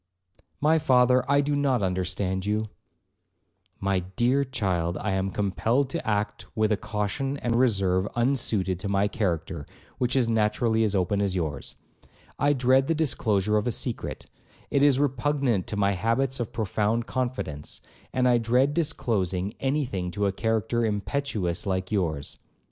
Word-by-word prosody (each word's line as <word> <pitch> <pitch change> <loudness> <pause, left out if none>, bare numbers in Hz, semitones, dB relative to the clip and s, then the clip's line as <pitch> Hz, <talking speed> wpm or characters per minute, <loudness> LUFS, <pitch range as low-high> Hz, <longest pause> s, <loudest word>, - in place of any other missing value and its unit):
'My 160 +2 +3
father, 125 -2 +4
I 140 0 +5
do 145 +1 0
not 135 -6 +1
understand 95 +1 -1
you.' 105 +2 -1 1.1
'My 95 -1 +1
dear 120 +10 +1
child, 95 -9 -1
I 105 - -2
am 95 0 0
compelled 115 +7 0
to 170 - -3
act 105 -1 -1
with 110 0 +2
a - - +4
caution 110 +8 -2
and 120 -4 -1
reserve 100 -6 +2
unsuited 115 -7 0
to 100 +1 -4
my 100 +1 +2
character, 85 -8 -2 0.3
which 125 +1 0
is 130 -3 +3
naturally 110 0 +2
as 105 -2 0
open 100 +2 +1
as 100 -2 0
yours. 75 -6 -3 0.6
I 145 +1 +3
dread 130 0 +3
the 165 - +1
disclosure 105 -9 +1
of 105 - 0
a - - +2
secret; 115 +1 -3 0.5
it 140 - +2
is 140 -2 +5
repugnant 135 -6 +1
to 105 - -3
my 100 -1 +3
habits 115 +7 0
of 120 - -3
profound 110 +1 0
confidence; 120 - -3 0.3
and 130 -1 +2
I 120 -1 +4
dread 125 +5 +2
disclosing 105 - -1
any 140 +2 0
thing 95 -7 -3
to 100 +3 0
a 100 - +2
character 115 +3 0
impetuous 105 -4 -2
like 95 0 -1
yours. 80 -8 -1
110 Hz, 155 wpm, -26 LUFS, 95-130 Hz, 1.1 s, I